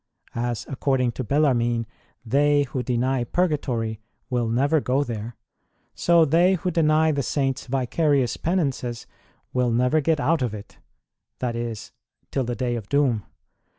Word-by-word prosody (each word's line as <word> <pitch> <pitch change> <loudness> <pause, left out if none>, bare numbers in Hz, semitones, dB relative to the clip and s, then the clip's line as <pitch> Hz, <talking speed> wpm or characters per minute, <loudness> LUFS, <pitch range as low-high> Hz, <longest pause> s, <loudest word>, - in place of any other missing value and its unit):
As 120 -1 -2
(according 130 -2 0
to 130 - -5
Bellarmine) 120 -4 +1 0.4
they 145 +4 +3
who 130 -1 -3
deny 125 +1 0
Purgatory 120 -8 -1 0.3
will 120 -2 0
never 140 +7 +2
go 135 +3 +1
there, 115 -2 -6 0.6
so 170 -1 +4
they 175 +5 +4
who 180 +1 -2
deny 160 -1 +3
the 140 -2 0
Saints 135 0 -1
vicarious 135 0 +1
Penances 135 -9 -2 0.5
will 125 -1 +2
never 125 +6 +2
get 160 +1 +1
out 160 +1 +1
of 120 -4 -1
it 105 - -12 0.6
(i.e., 120 -2 -2 0.6
till 135 - 0
the 120 0 -3
day 125 -1 -1
of 110 -3 -6
doom). 130 -8 +1
130 Hz, 140 wpm, -24 LUFS, 120-145 Hz, 0.6 s, so